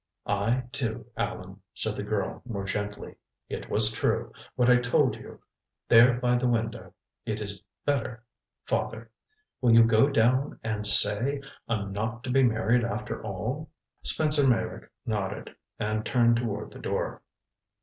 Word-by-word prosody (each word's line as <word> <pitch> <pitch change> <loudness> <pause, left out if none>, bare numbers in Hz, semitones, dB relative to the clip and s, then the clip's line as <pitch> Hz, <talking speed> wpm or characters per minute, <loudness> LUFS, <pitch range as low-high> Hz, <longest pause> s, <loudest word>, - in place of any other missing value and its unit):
"I 105 +5 0
do, 120 -6 -3
Allan," 95 +2 -4
said 110 -1 -1
the - - -4
girl 100 -1 -2
more 105 -6 -5
gently. 105 +1 -4 0.3
"It - - -6
was 110 0 +2
true 110 - -1 0.2
what 125 - +2
I 125 0 +7
told 125 -1 +2
you - - -12 0.5
there 120 +2 +7
by 125 0 +2
the 125 - +1
window. 115 -2 -2 0.3
It 110 -1 -3
is 100 -1 -5 0.2
better 130 -5 -1 0.4
father! 115 0 -2 0.5
Will 120 -3 +5
you 115 - +9
go 115 +4 +4
down 130 +2 +2
and 105 -1 -2
say 105 +7 +5 0.3
I'm 100 -3 -1
not 115 +4 -3
to 125 - -3
be 135 +1 +4
married, 115 0 +3
after 105 -2 -3
all?" 110 - -4 0.3
Spencer 150 -3 +2
Meyrick 115 -3 0 0.2
nodded, 105 -5 -3 0.2
and 110 +1 -1
turned 120 -1 +3
toward 105 -3 -3
the - - -11
door. - - -3
115 Hz, 150 wpm, -27 LUFS, 105-125 Hz, 0.5 s, you